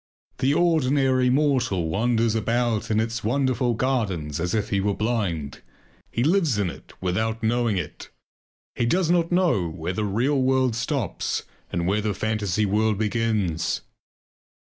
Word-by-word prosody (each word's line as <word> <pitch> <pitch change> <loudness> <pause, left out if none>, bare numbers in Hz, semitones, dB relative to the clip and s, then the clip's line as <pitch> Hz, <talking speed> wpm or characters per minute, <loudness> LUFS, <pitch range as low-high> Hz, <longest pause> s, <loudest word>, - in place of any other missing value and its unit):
The 135 +2 +2
ordinary 135 -6 +3
mortal 125 - +1
wanders 115 +4 +1
about 115 0 0
in 110 0 +2
its 115 +1 -2
wonderful 125 0 +1
gardens 100 - -1
as 90 +5 -1
if 110 -1 -1
he 100 -1 +1
were 100 0 0
blind; 95 - -2 0.5
he 120 - -1
lives 160 - +2
in 100 -4 0
it - - -14
without 110 +5 -1
knowing 115 -2 +1
it. 80 -5 -6 0.6
He 120 - 0
does 175 +4 +2
not 170 -1 +2
know 170 - +2
where 85 +2 -4
the 105 - -2
real 125 +8 +1
world 130 -2 +2
stops 125 - -2 0.3
and 85 0 -1
where 100 +4 +1
the 105 -2 -1
fantasy 105 -1 0
world 105 +1 +1
begins. 105 -6 0
115 Hz, 145 wpm, -24 LUFS, 100-130 Hz, 0.6 s, ordinary